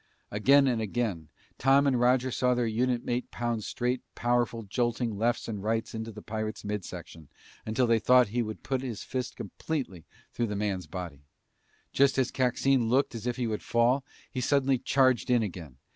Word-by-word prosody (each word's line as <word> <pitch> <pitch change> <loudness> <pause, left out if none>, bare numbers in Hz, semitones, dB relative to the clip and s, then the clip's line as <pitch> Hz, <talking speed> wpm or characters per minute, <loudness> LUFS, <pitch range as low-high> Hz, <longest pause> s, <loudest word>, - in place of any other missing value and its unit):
Again 135 +7 +5
and 120 -4 +1
again, 105 -7 -2 0.3
Tom 135 +2 +4
and 130 -3 +2
Roger 125 +1 +3
saw 125 +1 +2
their 120 -1 +1
unit 120 +2 0
mate 120 +1 -2
pound 120 -2 -2
straight, 125 +3 -2
powerful, 120 -1 0
jolting 120 +1 -1
lefts 115 +4 0
and 105 -4 -4
rights 110 +2 -1
into 110 0 -5
the 105 0 -11
pirate's 110 0 -4
mid 105 -1 -2
section 85 -4 -9 0.4
until 110 +4 +2
they 115 -1 +3
thought 125 0 +5
he 120 +3 0
would 110 -1 -5
put 130 -1 -1
his 120 -6 -5
fist 125 -1 -4
completely 125 - -5 0.3
through 120 - -1
the 105 - -3
man's 100 -4 -2
body. 85 -4 -7 0.7
Just 140 0 +3
as 130 -2 +1
Coxine 130 -1 +2
looked 130 +3 +2
as 115 0 -5
if 120 - 0
he 125 - -2
would 110 -2 -2
fall, 120 +3 +2 0.3
he 130 - -3
suddenly 135 -1 +2
charged 130 -2 +2
in 120 -2 +4
again. 85 -10 -7
120 Hz, 185 wpm, -29 LUFS, 105-125 Hz, 0.7 s, Again